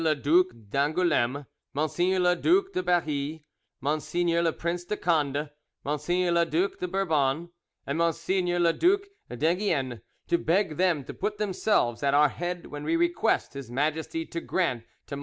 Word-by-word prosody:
le 155 -1 +3
Duc 160 +6 +4 0.2
d'Angouleme, 145 -3 +1 0.3
Mgr. 175 +5 +1
le 180 0 +3
Duc 380 - +2
de - - 0
Berry, 155 -4 -1 0.4
Mgr. 170 +4 0
le 165 - +3
Prince 170 +2 -3
de 210 - -2
Conde, 150 -5 0 0.3
Mgr. 175 +5 0
le 170 0 +4
Due 170 +5 +1
de 180 - -2
Bourbon, 165 -4 0 0.3
and 140 +4 -2
Mgr. 175 +2 0
le 170 -1 +4
Duc 395 - +2 0.2
d'Enghien, 145 - 0 0.3
to 170 - +2
beg 170 -2 +1
them 175 -5 +2
to - - -8
put 210 +1 -3
themselves 190 - +1
at 140 0 +2
our 150 0 +5
head 175 +2 -4
when 145 0 -7
we 160 +2 +1
request 175 -2 +1
His 140 -4 -8
Majesty 155 +5 -1
to 170 - -5
grant 130 -11 -1 0.2
to - - -6
MM. - - -6
165 Hz, 160 wpm, -27 LUFS, 145-180 Hz, 0.4 s, our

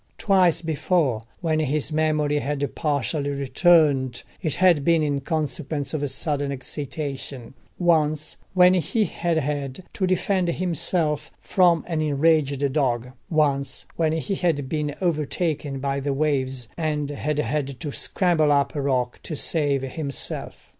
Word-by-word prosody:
Twice 185 -4 +3
before, 155 -6 +1 0.2
when 160 -3 +1
his 150 0 0
memory 150 -1 +1
had 145 0 -2
partially 145 -1 -1
returned, 140 -2 +3 0.2
it 160 -6 -1
had 175 -6 +4
been 165 0 +3
in 145 -2 0
consequence 150 -1 -3
of 145 -2 -1
sudden 140 +1 -2
excitation: 135 -2 -6 0.2
once 155 -3 +1 0.2
when 180 0 +7
he 185 - +1
had 170 -1 -1
had 145 +1 -2
to 190 - 0
defend 185 0 +1
himself 170 -3 0
from 175 -4 +3
an 165 -3 -1
enraged 145 -2 +2
dog: 125 -5 0 0.2
once 140 -4 0
when 160 -2 +1
he 160 +5 -2
had 165 -7 0
been 150 0 -2
overtaken 155 -3 -1
by 140 +1 -1
the 140 0 -1
waves, 135 -4 -1
and 150 -3 -1
had 145 +1 -2
had 140 0 -2
to 150 -4 -4
scramble 160 -2 +1
up 140 -1 +2
a 145 - -2
rock 125 -3 0
to 155 - -5
save 145 -3 0
himself. 140 0 -4
150 Hz, 140 wpm, -24 LUFS, 140-165 Hz, 0.2 s, when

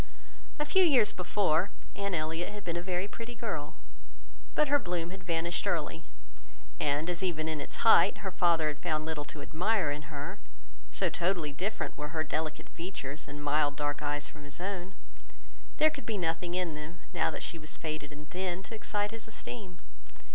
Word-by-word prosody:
A 295 - +1
few 375 +6 +6
years 260 - +6
before, 180 -1 +2 0.3
Anne 200 -2 0
Elliot 160 +2 0
had 205 -1 -7
been 170 -2 -1
a 175 - 0
very 180 +1 0
pretty 230 +3 -7
girl, 165 -11 -3 0.8
but 300 - +5
her 290 +1 +5
bloom 175 -5 -1
had 190 -1 -8
vanished 170 +2 0
early; 165 -2 0 0.7
and 145 +2 +2
as 175 0 0
even 165 -4 0
in 155 -2 -1
its - - -4
height, 225 - +7
her 190 - 0
father 170 -4 +4
had 150 0 -4
found 155 -2 0
little 155 -2 -2
to 145 +1 -7
admire 180 -1 +2
in 150 0 -4
her, 155 +6 -4 0.5
(so - - +2
totally 170 -4 +1
different 195 +9 -2
were 150 +2 -4
her 160 - +3
delicate 155 0 -2
features 155 -5 -5
and 145 0 -6
mild 145 0 +3
dark 145 0 -1
eyes 145 0 0
from 150 - -11
his 145 +2 -7
own), 190 0 -3 0.8
there 310 0 +6
could 280 -7 -8
be 220 -2 0
nothing 170 0 0
in 180 -3 +1
them, 150 +3 -7
now 170 -3 +3
that - - -4
she 165 - -3
was 155 0 -5
faded 155 -2 -4
and 150 +1 -9
thin, 185 0 -1
to 225 - -8
excite 210 -1 -1
his 225 -1 -5
esteem. 205 -4 -7
170 Hz, 190 wpm, -32 LUFS, 155-195 Hz, 0.8 s, height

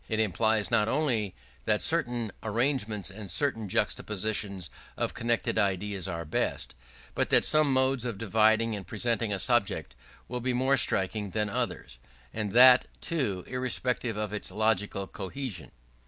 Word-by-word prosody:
It 110 -1 0
implies 110 +1 +1
not 110 -2 +3
only 115 -7 0 0.3
that - - +2
certain 120 -3 0
arrangements 110 -3 -1
and 100 0 -9
certain 115 - 0
juxtapositions 100 -3 0 0.3
of - - -2
connected 115 -1 -1
ideas 100 -1 -1
are 85 -2 -4
best; 75 - -2 0.4
but - - -1
that - - +4
some 155 -2 +4
modes 130 -1 +2
of 120 -5 -3
dividing 110 +1 +2
and 95 -4 -8
presenting 115 +1 -1
a 100 - +1
subject 100 - 0 0.3
will 125 0 -4
be 130 +1 0
more 130 +2 +2
striking 100 -3 +1
than 105 +1 -1
others; - - -3 0.3
and 105 -2 -3
that, 125 +1 +8
too, 115 - -2
irrespective 125 -2 -2
of 105 -1 -3
its 105 - -3
logical 105 -2 0
cohesion. 100 - -6
110 Hz, 145 wpm, -28 LUFS, 100-125 Hz, 0.4 s, that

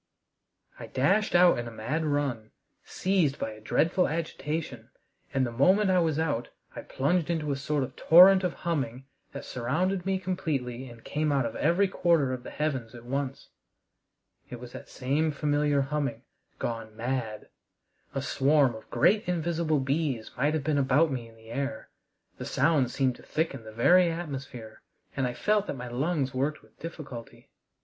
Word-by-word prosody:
I - - -7
dashed 195 +11 +1
out 175 -6 +6
in 120 - -4
a - - -7
mad 125 +9 -2
run, 140 -7 -1 0.3
seized 180 -7 0
by 110 - -3
a 110 0 -12
dreadful 165 - +2
agitation, 150 -5 -4 0.4
and 130 -1 +1
the 120 - -4
moment 190 - +4
I 185 - +4
was 160 -3 +1
out 145 -7 -1 0.3
I - - -5
plunged 160 +5 0
into 155 -3 -1
a - - 0
sort 145 +1 -1
of 130 - -7
torrent 185 +3 +7
of 180 - 0
humming 135 -6 -2 0.3
that 140 - -7
surrounded 175 +10 -1
me 190 +1 0
completely 135 -9 -3
and 115 -1 -14
came 150 0 -1
out 135 -3 +2
of 115 - -4
every 175 +6 +2
quarter 165 -8 +2
of 125 - -5
the - - -9
heavens 130 -6 -3
at 120 0 -11
once. 135 +1 -4 1.0
It 125 - -7
was 125 0 -10
that - - -10
same 140 +5 0
familiar 145 -1 +1
humming 145 +1 -2 0.3
gone 115 -2 -5
mad! 115 -3 -3 0.7
A 135 - -1
swarm 140 -2 +3
of 110 - -12
great 210 -1 +3
invisible 165 -3 0
bees 135 -4 -1
might 145 +5 +1
have 155 - -1
been 150 -1 +1
about 140 +4 +3
me 120 -3 -4
in 115 - -18
the 110 0 -14
air. 140 +2 -4 0.5
The - - -5
sound 145 -7 +2
seemed 130 -1 0
to - - -15
thicken 140 -7 -3
the 110 - -9
very 175 +11 +5
atmosphere, 135 -9 -6 0.3
and 135 -2 0
I 120 - -4
felt 210 -1 +1
that - - -3
my 125 -1 -6
lungs 135 +1 -1
worked 140 +4 -1
with - - -25
difficulty. 145 -8 -9
140 Hz, 175 wpm, -28 LUFS, 125-165 Hz, 1.0 s, torrent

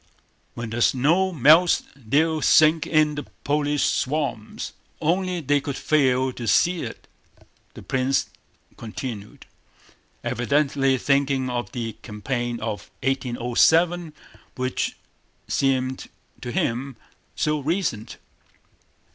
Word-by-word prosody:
"When 115 -1 -5
the 120 +1 -2
snow 165 +11 +3
melts 160 +3 +5
they'll 150 +6 +1
sink 155 +1 +5
in 155 -2 +3
the 145 - -4 0.2
Polish 145 0 +1
swamps. 135 -6 -2 0.3
Only 180 +2 0
they 145 0 +1
could 140 -1 -4
fail 130 -3 +2
to 120 -2 -6
see 175 +8 +3
it," - - -8 0.7
the - - -10
prince 130 +1 0 0.5
continued, 110 -2 -7 0.8
evidently 135 +1 +1
thinking 135 -1 +1
of 120 -5 -3
the 115 -2 -4
campaign 120 +2 -3
of 110 -2 -4
1807 135 +7 +2 0.4
which 130 0 -2 0.5
seemed 130 -1 0 0.3
to 125 - -5
him 125 +3 -2 0.4
so 150 0 0
recent. 150 - -2
135 Hz, 105 wpm, -24 LUFS, 120-155 Hz, 0.8 s, melts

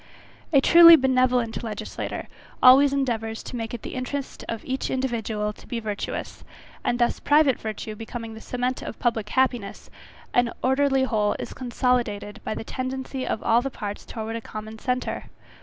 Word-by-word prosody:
A 280 -3 +5
truly 335 +2 +10
benevolent 255 -4 +2
legislator 220 -2 -5 0.4
always 270 +2 +8
endeavours 230 -5 -2
to - - -7
make 225 -2 -4
it 235 - -9
the - - -6
interest 260 +2 -4
of 230 -1 -4
each 260 +1 -2
individual 225 -5 -2
to - - -17
be 240 - -3
virtuous; 210 -2 -5 0.4
and 240 - 0
thus 240 -1 +1
private 290 -3 +4
virtue 215 0 -5
becoming 225 +1 -7
the 220 - -10
cement 250 +1 -2
of - - -7
public 225 -4 -1
happiness, 245 -6 -1 0.4
an 245 -1 +3
orderly 270 +1 +3
whole 215 -5 +1
is - - -6
consolidated 240 -5 -1
by - - -3
the - - -5
tendency 260 +2 -4
of - - -2
all 230 +1 +4
the 275 - -3
parts 205 -5 -6
towards 225 0 -5
a - - -14
common 215 0 -8
centre. 250 +1 -2
245 Hz, 165 wpm, -25 LUFS, 220-260 Hz, 0.4 s, truly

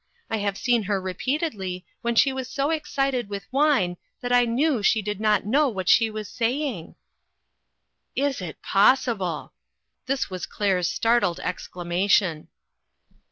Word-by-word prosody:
I 225 - +1
have 200 -1 -2
seen 240 0 +2
her 200 -2 +1
repeatedly 190 - -3 0.2
when 235 0 -1
she 270 +3 +4
was 260 -1 -5
so 280 +2 -1
excited 275 -7 -1
with 200 -1 -5
wine 270 -12 +2 0.2
that 245 -1 -1
I 245 0 +5
knew 250 +2 +1
she 220 +2 +3
did 210 -1 -4
not 210 -3 +2
know 280 +7 +3
what 190 -6 -5
she 225 +3 +5
was 215 -1 -6
saying." 245 - -2 0.6
" - - -53
Is 270 -7 -3
it 170 -4 -8
possible! 200 - +2 0.3
" - - -55
This 270 0 0
was 185 -2 -5
Claire's 190 -4 0
start 235 +1 +2
led 170 -1 0
exclamation. 180 -1 0
220 Hz, 155 wpm, -25 LUFS, 190-260 Hz, 0.6 s, I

